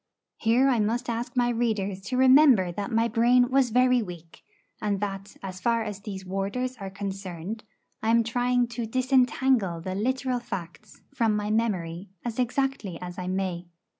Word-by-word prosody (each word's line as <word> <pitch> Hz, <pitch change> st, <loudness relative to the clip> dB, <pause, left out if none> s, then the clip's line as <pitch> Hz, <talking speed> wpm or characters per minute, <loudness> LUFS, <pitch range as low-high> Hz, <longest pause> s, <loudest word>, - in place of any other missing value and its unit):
Here 235 Hz, +4 st, +3 dB
I 250 Hz, -4 st, +3 dB
must 235 Hz, +4 st, 0 dB
ask 235 Hz, +2 st, -4 dB
my 245 Hz, -1 st, +3 dB
readers 215 Hz, -5 st, -1 dB
to 250 Hz, +4 st, -2 dB
remember 260 Hz, -, +6 dB
that 200 Hz, +3 st, -4 dB
my 225 Hz, 0 st, +2 dB
brain 245 Hz, +2 st, +3 dB
was 265 Hz, -2 st, +3 dB
very 250 Hz, +1 st, +4 dB
weak, 170 Hz, -5 st, -9 dB, 0.4 s
and 205 Hz, -2 st, 0 dB
that, 195 Hz, -1 st, -5 dB
as 185 Hz, -1 st, -6 dB
far 230 Hz, +1 st, +1 dB
as 210 Hz, -2 st, -5 dB
these 195 Hz, -2 st, -7 dB
warders 200 Hz, +7 st, -2 dB
are 195 Hz, -3 st, -6 dB
concerned, 195 Hz, 0 st, -6 dB, 0.4 s
I 220 Hz, -, 0 dB
am 230 Hz, 0 st, +4 dB
trying 245 Hz, +2 st, +1 dB
to 240 Hz, -1 st, -4 dB
disentangle 255 Hz, -6 st, +2 dB
the 185 Hz, +3 st, -4 dB
literal 255 Hz, +4 st, -1 dB
facts 195 Hz, -2 st, -8 dB
from 225 Hz, -2 st, +1 dB
my 210 Hz, 0 st, -1 dB
memory 190 Hz, -5 st, -1 dB, 0.2 s
as 235 Hz, 0 st, -4 dB
exactly 250 Hz, -7 st, -1 dB
as 180 Hz, +1 st, -7 dB
I 180 Hz, -, -4 dB
may. 185 Hz, -2 st, -2 dB
220 Hz, 165 wpm, -26 LUFS, 195-245 Hz, 0.4 s, remember